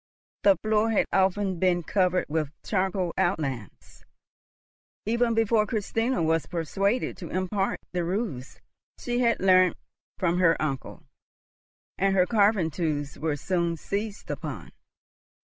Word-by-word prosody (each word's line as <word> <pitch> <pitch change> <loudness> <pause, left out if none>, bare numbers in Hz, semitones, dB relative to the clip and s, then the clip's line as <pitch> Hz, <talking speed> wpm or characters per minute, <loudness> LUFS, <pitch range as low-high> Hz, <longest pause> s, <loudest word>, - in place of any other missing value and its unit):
The 195 -2 +5
floor 215 +1 +2
had 220 - +2
often 190 -1 +1
been 180 -2 +2
covered 180 +1 +1
with 155 -1 -1
charcoal 190 -3 -1
outlines 135 - -3 1.0
even 230 +1 +1
before 225 -1 +2
Christina 225 0 -1
was 160 0 +1
persuaded 195 +7 -1
to 170 - -8
impart 190 +2 -1
the 180 -1 -1
rules 175 - -3 0.4
she 245 0 -2
had 235 -2 +2
learnt 185 -2 +4 0.4
from 175 -1 +1
her 165 -2 +4
uncle; 140 -4 -4 1.0
and 195 0 +2
her 180 -1 +4
carving 200 -5 +2
tools 145 -3 -3
were 155 -2 -1
soon 170 +2 -1
seized 205 +5 -4
upon. - - -6
185 Hz, 125 wpm, -26 LUFS, 165-210 Hz, 1.0 s, The